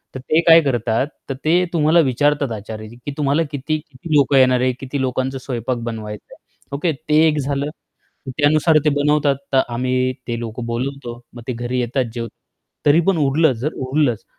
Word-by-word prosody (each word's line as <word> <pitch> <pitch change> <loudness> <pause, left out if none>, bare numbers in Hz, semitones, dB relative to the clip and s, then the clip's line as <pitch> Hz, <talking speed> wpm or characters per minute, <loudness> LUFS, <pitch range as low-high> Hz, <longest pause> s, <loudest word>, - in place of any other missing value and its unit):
तर - - -4
ते 155 +5 +1
काय 165 0 +9
करतात? 120 -2 0 0.2
तर - - -1
ते 175 +3 +3
तुम्हाला 160 +1 +4
विचारतात 145 -1 +1
आचारी 110 0 -7
की, 120 +4 -8
"तुम्हाला 145 +2 +1
किती 145 +2 -2
किती 150 +1 -8
लोकं 140 -1 +4
येणार 130 -1 +5
आहे? 130 0 +2
किती 135 +1 -4
लोकांचा 130 +1 -1
स्वयंपाक 125 -1 -3
बनवायचाय?" 105 -2 -7 0.4
ओके, 160 +4 0
ते 150 +2 -2
एक 155 -1 +1
झालं. 140 +1 -2 0.6
तर 130 - -3
त्यानुसार 155 +2 +4
ते - - +5
बनवतात. 150 -1 +2 0.2
तर - - +4 0.2
आम्ही 130 +1 0
ते 120 -1 -2
लोक 115 0 -6
बोलवतो. 120 0 -4
मग 120 - -10
ते 125 - -1
घरी 120 +2 -3
येतात 125 +2 0
जेवतात 115 -2 -7 0.4
तरी 145 +3 +5
पण 195 -4 +3
उरलंच 145 -2 +2
जर 145 +7 -3
उरलंच 130 -5 +1
135 Hz, 180 wpm, -20 LUFS, 120-150 Hz, 0.6 s, काय